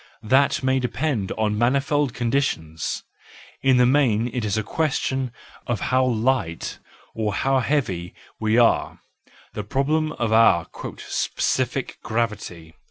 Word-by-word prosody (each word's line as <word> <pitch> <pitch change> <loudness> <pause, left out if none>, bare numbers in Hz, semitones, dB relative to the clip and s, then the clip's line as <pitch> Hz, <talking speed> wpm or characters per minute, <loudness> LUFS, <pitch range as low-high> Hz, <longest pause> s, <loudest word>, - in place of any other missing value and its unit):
That 130 +6 +3
may 130 0 +2
depend 125 -4 -1
on 105 -1 -1
manifold 140 +2 +1
conditions: 115 - -1 0.6
in 130 -1 +4
the 125 - +5
main 125 -4 +3
it 125 -3 -2
is 105 -1 0
a 110 - 0
question 135 -1 -1 0.4
of 120 -4 -1
how 130 0 +4
light 120 -8 0 0.3
or 105 -2 -2
how 135 +2 +2
heavy 100 - -1 0.2
we 110 +1 +1
are, 120 -1 +3 0.5
the 105 - -4
problem 155 +7 0
of 115 -2 -1
our 110 -7 +5 0.3
"specific 130 +1 -2
gravity." 105 -8 -3
120 Hz, 125 wpm, -23 LUFS, 105-135 Hz, 0.6 s, the